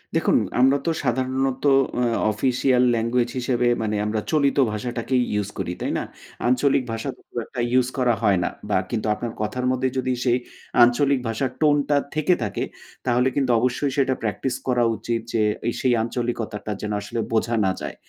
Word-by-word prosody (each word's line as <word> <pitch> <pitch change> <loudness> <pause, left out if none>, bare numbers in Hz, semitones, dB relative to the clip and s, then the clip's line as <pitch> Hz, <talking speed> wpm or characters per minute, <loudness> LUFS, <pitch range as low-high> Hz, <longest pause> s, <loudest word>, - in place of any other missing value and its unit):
দেখুন - - +3 0.2
আমরা 135 +2 +5
তো 165 - +2
সাধারণত 130 +1 0 0.4
আ - - +2 0.3
অফিসিয়াল 125 +3 +2
ল্যাঙ্গুয়েজ 120 +1 +1
হিসেবে 125 -1 +1
মানে 105 -1 -1
আমরা 105 +1 -1
চলিত 145 -3 +2
ভাষাটাকেই 120 +4 -1
ইউস 105 -1 -1
করি, 90 -2 -2
তাই - - -1
না? - - -2 0.4
আঞ্চলিক 130 +2 +3
ভাষা 115 0 -3
খুব - - -28
একটা 125 - -8
ইউস 125 -1 +3
করা 125 -2 +3
হয় 100 -3 +4
না। - - 0 0.2
বা 105 - +3
কিন্তু 110 -2 -1
আপনার 115 +2 -4
কথার 115 +4 -2
মধ্যে 130 0 0
যদি 130 0 0
সেই 120 -1 +3 0.5
আঞ্চলিক 135 +3 +3
ভাষার 115 +3 -1
টোন 150 -1 +5
টা 145 - +4 0.2
থেকে 155 +4 +3
থাকে, 105 - -2 0.4
তাহলে 125 0 +2
কিন্তু 135 -3 +1
অবশ্যই 130 +4 0
সেটা 135 -1 +3
প্র্যাকটিস 110 +4 -2
করা 125 -2 +2
উচিত 115 +1 -2
যে, 115 - +2 0.3
এ - - +3
সেই 130 -2 +3
আঞ্চলিকতাটা 115 -3 -3
যেন 105 - -3
আসলে 105 +3 -5
বোঝা 115 +1 +1
না 95 - +2
যায়। - - -5
125 Hz, 175 wpm, -23 LUFS, 115-130 Hz, 0.5 s, আমরা